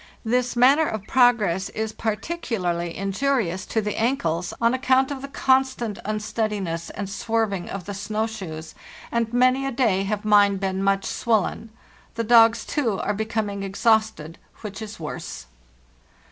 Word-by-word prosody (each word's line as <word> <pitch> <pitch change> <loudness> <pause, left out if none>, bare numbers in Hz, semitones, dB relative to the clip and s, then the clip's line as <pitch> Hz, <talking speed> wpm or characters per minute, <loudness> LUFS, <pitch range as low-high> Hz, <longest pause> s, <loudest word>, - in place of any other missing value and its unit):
This 245 +2 0
manner 275 +6 +5
of 215 -2 -4
progress 215 -8 +3
is 220 0 -4
particularly 210 - -3
injurious 195 -2 -1
to 220 - 0
the 210 0 -3
ankles, 175 -9 0
on 230 +1 +3
account 260 +1 +2
of 275 -2 -5
the 275 - -6
constant 260 -5 +1
unsteadiness 210 -5 -2
and 200 - -5
swerving 205 -2 -1
of 195 -3 -6
the 205 - -5
snow 215 +2 -2
shoes, 165 -8 -7 0.4
and 230 -1 0
many 255 +2 +3
a 270 - -1
day 230 -7 +2
have 210 +1 -3
mine 205 -2 +5
been 190 0 -2
much 195 0 +1
swollen. 225 0 0 0.5
The 230 - -1
dogs, 230 0 +5
too, 235 -10 -1
are 210 - -1
becoming 215 -1 -2
exhausted, 200 -4 0 0.2
which 210 -1 -7
is 215 -3 -8
worse. 150 - -6
215 Hz, 145 wpm, -24 LUFS, 195-240 Hz, 0.5 s, manner